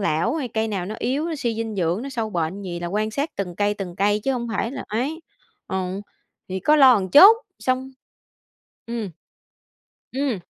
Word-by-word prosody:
lão 170 Hz, -, +1 dB
hay 280 Hz, -6 st, -2 dB
cây 220 Hz, 0 st, -1 dB
nào 190 Hz, -4 st, -3 dB
nó 215 Hz, -, -5 dB
yếu, 305 Hz, +6 st, -1 dB
suy 235 Hz, -4 st, -1 dB
dinh 225 Hz, -1 st, -3 dB
dưỡng, 175 Hz, +3 st, 0 dB
nó 275 Hz, -, -5 dB
sâu 230 Hz, -5 st, -3 dB
bệnh 175 Hz, +2 st, -2 dB
gì 175 Hz, -2 st, -5 dB
là 175 Hz, -, -3 dB
quan 215 Hz, +4 st, -1 dB
sát 285 Hz, +7 st, -2 dB
từng 180 Hz, -3 st, -3 dB
cây, 205 Hz, 0 st, +1 dB
từng 185 Hz, -3 st, -6 dB
cây 205 Hz, +2 st, +2 dB
chứ 270 Hz, -, +2 dB
hông 235 Hz, -2 st, -3 dB
phải 230 Hz, -, -1 dB
là -, -, -6 dB
ấy. 270 Hz, +10 st, -2 dB, 0.5 s
Ừ, 190 Hz, 0 st, -3 dB, 0.5 s
thì 190 Hz, 0 st, -3 dB
có 300 Hz, +10 st, +4 dB
lo 270 Hz, -3 st, +8 dB
một 190 Hz, -3 st, 0 dB
chút 400 Hz, +10 st, +10 dB, 0.2 s
xong 260 Hz, +1 st, -1 dB, 1.0 s
ừm, 230 Hz, -5 st, -4 dB, 1.0 s
ừm. 265 Hz, -5 st, -1 dB
215 Hz, 195 wpm, -23 LUFS, 190-260 Hz, 1.0 s, chút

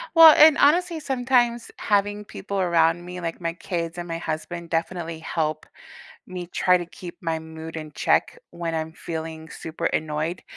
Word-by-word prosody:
Well, 325 Hz, -2 st, +10 dB
and, 305 Hz, -1 st, +8 dB
honestly, 340 Hz, +2 st, +3 dB
sometimes 245 Hz, -4 st, +1 dB
having 205 Hz, 0 st, 0 dB
people 200 Hz, 0 st, -5 dB
around 170 Hz, -1 st, +2 dB
me, 180 Hz, 0 st, -7 dB
like 165 Hz, 0 st, -4 dB
my 165 Hz, -1 st, -2 dB
kids 170 Hz, -1 st, -4 dB
and 175 Hz, 0 st, -5 dB
my 165 Hz, 0 st, -3 dB
husband, 165 Hz, +1 st, -5 dB
definitely 165 Hz, 0 st, -2 dB
help 155 Hz, -1 st, -2 dB, 0.6 s
me 180 Hz, -1 st, -6 dB
try 180 Hz, +1 st, +3 dB
to 175 Hz, -, -5 dB
keep 175 Hz, 0 st, -10 dB
my 165 Hz, -1 st, -1 dB
mood 160 Hz, 0 st, -9 dB
in 155 Hz, -1 st, -7 dB
check -, -, +1 dB
when 170 Hz, -1 st, -4 dB
I'm 160 Hz, 0 st, -3 dB
feeling 160 Hz, -1 st, -6 dB
super 165 Hz, +1 st, -7 dB
annoyed, 155 Hz, +3 st, -2 dB
170 Hz, 165 wpm, -24 LUFS, 160-200 Hz, 0.6 s, Well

